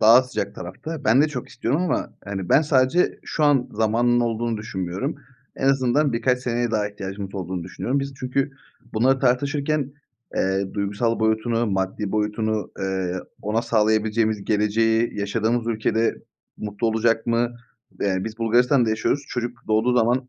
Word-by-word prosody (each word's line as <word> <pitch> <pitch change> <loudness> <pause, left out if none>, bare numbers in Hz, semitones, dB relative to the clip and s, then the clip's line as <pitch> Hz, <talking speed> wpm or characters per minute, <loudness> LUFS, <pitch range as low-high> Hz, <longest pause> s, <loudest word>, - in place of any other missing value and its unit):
daha 115 +4 +8
sıcak 105 -6 -4
tarafta. 145 - -7
Ben 125 +6 +5
de 155 - +2
çok 125 -5 -5
istiyorum. 140 +10 -1
Ama, 180 - -1
hani, 95 -3 -4
ben 150 - +5
sadece 145 +4 +2
şu 155 - -1
an 140 -4 +3
zamanının 115 +3 +2
olduğunu 115 -1 -1
düşünmüyorum. 100 - -3 0.4
En 135 - +1
azından 135 +1 +2
birkaç 125 +2 +1
seneye 120 -1 -1
daha 105 -2 0
ihtiyacımız 100 -1 -6
olduğunu 90 -2 -4
düşünüyorum. 125 +9 -2
Biz 140 0 -4
çünkü 135 +2 0 0.4
bunları 130 +4 +3
tartışırken, 140 +2 +1 0.4
eee, 95 +1 0
duygusal 105 +3 0
boyutunu, 110 +1 +1
maddi 95 +1 -2
boyutunu, 110 0 -1
eee, 95 -2 -1 0.3
ona 110 +3 0
sağlayabileceğimiz 110 -1 +1
geleceği, 110 +1 +1
yaşadığımız 115 +3 0
ülkede 115 0 +1 0.4
mutlu 105 +2 -3
olacak 115 +1 +1
mı? 120 +1 +1 0.5
Eee, 95 -2 +1
biz 110 +3 -6
Bulgaristan'da 120 +1 +3
yaşıyoruz. 140 +6 0
Çocuk 120 -1 -3
doğduğu 110 +3 +3
zaman 125 +3 +1
115 Hz, 145 wpm, -23 LUFS, 105-125 Hz, 0.5 s, daha